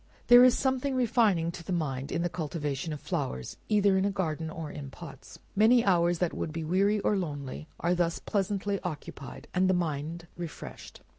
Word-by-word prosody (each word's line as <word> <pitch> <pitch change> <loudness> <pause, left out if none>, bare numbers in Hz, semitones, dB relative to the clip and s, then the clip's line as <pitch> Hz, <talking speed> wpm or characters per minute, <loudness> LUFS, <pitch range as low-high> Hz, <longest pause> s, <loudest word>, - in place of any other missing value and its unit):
There 245 0 +10
is 255 -1 +6
something 265 0 0
refining 215 -9 +2
to 170 - -9
the 175 - -6
mind 140 -6 -2
in 170 - 0
the - - +2
cultivation 150 -3 -3
of 150 - -4
flowers, 65 - -3
either 200 -2 +4
in - - +1
a - - +2
garden 165 -5 -2
or 160 -2 -6
in 140 -2 -7
pots. 150 +1 -11 0.2
Many 230 +4 +5
hours 175 -2 +3
that 175 0 0
would 155 - -3
be 165 +1 -4
weary 195 +6 +2
or 210 - +2
lonely, 150 -5 -4
are 175 +1 +1
thus 175 -1 +1
pleasantly 200 0 -1
occupied, 145 -6 -7
and 185 +1 +3
the 185 - +4
mind 165 0 -2
refreshed. 170 -3 -8
175 Hz, 190 wpm, -29 LUFS, 155-200 Hz, 0.2 s, There